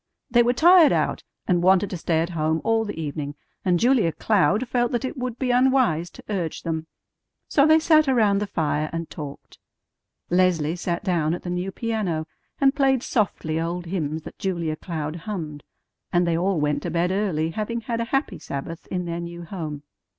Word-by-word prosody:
They 240 0 +6
were 240 +1 +3
tired 340 +3 +7
out, - - 0 0.2
and 175 -1 +2
wanted 190 +2 +4
to 180 - -3
stay 160 0 +1
at 170 +2 -2
home 160 -1 0
all 225 0 +2
the 205 -5 -5
evening, 145 -2 -4 0.3
and 180 -2 +2
Julia 240 -8 +3
Cloud 215 +6 +2
felt 240 -1 +1
that 240 +2 0
it 260 - -4
would 250 -3 -4
be 255 -1 0
unwise 245 -10 +3
to - - -14
urge 180 -7 -3
them; 160 -1 -3 0.6
so 280 0 +4
they 315 0 +7
sat 310 -2 +4
around 215 -6 +3
the 205 - -2
fire 155 -3 -1
and 165 0 -5
talked. 145 -3 -9 0.7
Leslie 175 -3 +2
sat 175 +1 -3
down 170 -4 +1
at - - -9
the 175 - -4
new 180 +2 -2
piano, 200 -8 -2 0.3
and 270 -1 +4
played 270 -3 +2
softly 165 -8 -1
old 175 +1 -3
hymns 160 -3 -3
that - - -11
Julia 170 -5 -1
Cloud 155 -1 -4
hummed; 165 -6 -6 0.5
and 175 0 +3
they 170 -1 +1
all 180 +1 +1
went 150 -1 0
to - - -3
bed 175 +1 +1
early, 180 -5 0
having 220 +5 -3
had 230 0 -2
a - - -1
happy 270 +4 -1
Sabbath 150 +4 -6
in 180 -1 -3
their 170 0 -3
new 170 0 -7
home. 155 -5 -6
180 Hz, 195 wpm, -24 LUFS, 160-230 Hz, 0.7 s, tired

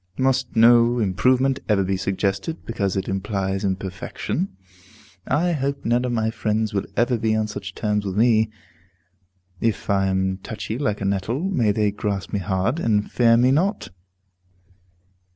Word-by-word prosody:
Must 130 -1 0
no 120 +1 +5
improvement 125 +6 +2
ever 100 -2 +3
be 95 +1 0
suggested, 100 - -2
because 100 -4 -2
it 95 - -2
implies 95 0 -2
imperfection? 95 - -3 0.8
I 165 +6 +1
hope 140 -2 -2
none 120 +2 +2
of 125 - -1
my 110 -2 0
friends 110 -1 -1
will 100 - -1
ever 120 0 +2
be 110 0 +1
on 110 0 +1
such 100 -2 -7
terms 105 -2 -1
with 95 -1 -4
me; 110 -1 +4 1.1
if 115 -1 -1
I 95 -1 +2
am 95 0 0
touchy 110 +3 -5
like 105 -8 -1
a - - -2
nettle, 100 - -1
may 115 - +2
they 105 0 +1
grasp 100 -1 -4
me 100 - +1
hard, 95 - -1
and 105 -7 0
fear 115 -1 +4
me 125 +2 +4
not. 185 +9 0
110 Hz, 155 wpm, -22 LUFS, 100-120 Hz, 1.1 s, no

